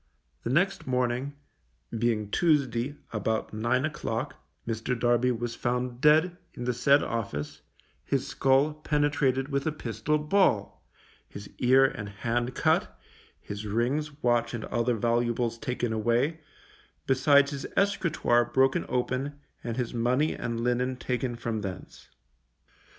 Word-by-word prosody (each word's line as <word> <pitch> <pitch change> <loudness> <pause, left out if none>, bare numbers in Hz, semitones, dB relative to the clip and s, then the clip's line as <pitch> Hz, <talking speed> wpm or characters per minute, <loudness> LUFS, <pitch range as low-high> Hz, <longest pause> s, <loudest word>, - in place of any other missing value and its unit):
The - - -4
next 185 +7 +1
morning, 125 +2 -1 0.6
being 110 -3 0
Tuesday, 140 -5 +1 0.2
about 110 +1 -1
nine 120 +5 +1
o'clock, 135 -3 -3 0.3
Mr. 115 +2 -2
Darby 120 +1 +3
was 120 0 -3
found 125 +1 -2
dead 160 +4 +4 0.2
in 120 - -6
the 125 0 0
said 140 +4 +4
office, 75 -10 -4 0.4
his 135 -1 -1
skull 135 +2 +2
penetrated 145 -3 0
with 140 +1 -1
a - - +2
pistol 120 +1 -1
ball, 150 - +1 0.5
his 100 0 -10
ear 130 +2 +5
and 105 -6 -3
hand 120 +5 -2
cut, 65 0 +1 0.4
his 105 +1 -7
rings, 140 +7 -1
watch 120 -1 +2
and 110 - -5
other 120 +1 0
valuables 120 +1 0
taken 125 -4 -2
away, 120 +8 +1 0.7
besides 140 +2 +4
his 140 -1 -5
escritoire 170 -11 +2
broken 135 +3 +2
open, 130 +3 -2 0.2
and 115 0 -4
his 125 -1 -2
money 125 +6 +1
and 115 0 -3
linen 125 +2 0
taken 125 -1 -2
from 115 -2 -3
thence. 95 -2 -8
125 Hz, 130 wpm, -28 LUFS, 115-140 Hz, 0.7 s, ear